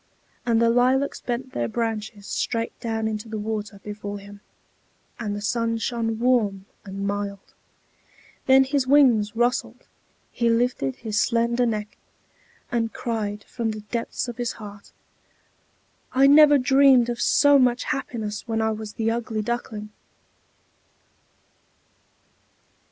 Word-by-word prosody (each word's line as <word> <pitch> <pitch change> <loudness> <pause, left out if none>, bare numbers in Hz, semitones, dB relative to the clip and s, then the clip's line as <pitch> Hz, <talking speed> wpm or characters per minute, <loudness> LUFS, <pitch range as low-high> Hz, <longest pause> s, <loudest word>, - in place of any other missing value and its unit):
And 230 -1 +3
the 230 0 +4
lilacs 255 +3 +2
bent 255 +2 -4
their 120 -1 -1
branches 220 - -3
straight 230 +1 -2
down 225 -1 -2
into 215 0 -4
the 220 - -4
water 210 -1 -4
before 205 -1 -6
him, 200 0 -12 0.8
and 210 -3 -3
the 205 - -5
sun 230 +1 0
shone 225 0 -2
warm 220 -6 +1 0.2
and 195 0 -5
mild. 200 -1 -4 0.9
Then 265 0 +7
his 265 -1 0
wings 245 -7 +4
rustled, 245 +3 -1 0.5
he 235 -1 0
lifted 230 - 0
his 215 -2 -2
slender 235 +1 +1
neck, 210 -2 -4 0.7
and 230 -2 0
cried 210 -3 -3
from 235 -2 -3
the 215 -1 -5
depths 235 +1 -3
of 240 - -6
his 240 -1 -2
heart: 205 -2 -11 1.2
"I 265 +1 +5
never 290 +1 +7
dreamed 265 -2 +5
of 240 0 -3
so 285 -1 +5
much 245 -1 +2
happiness 235 -7 -4
when 225 -1 -1
I 220 0 +1
was 215 -1 -6
the 225 0 0
Ugly 225 -2 -2
Duckling." 215 -2 -4
230 Hz, 130 wpm, -24 LUFS, 210-245 Hz, 1.2 s, Then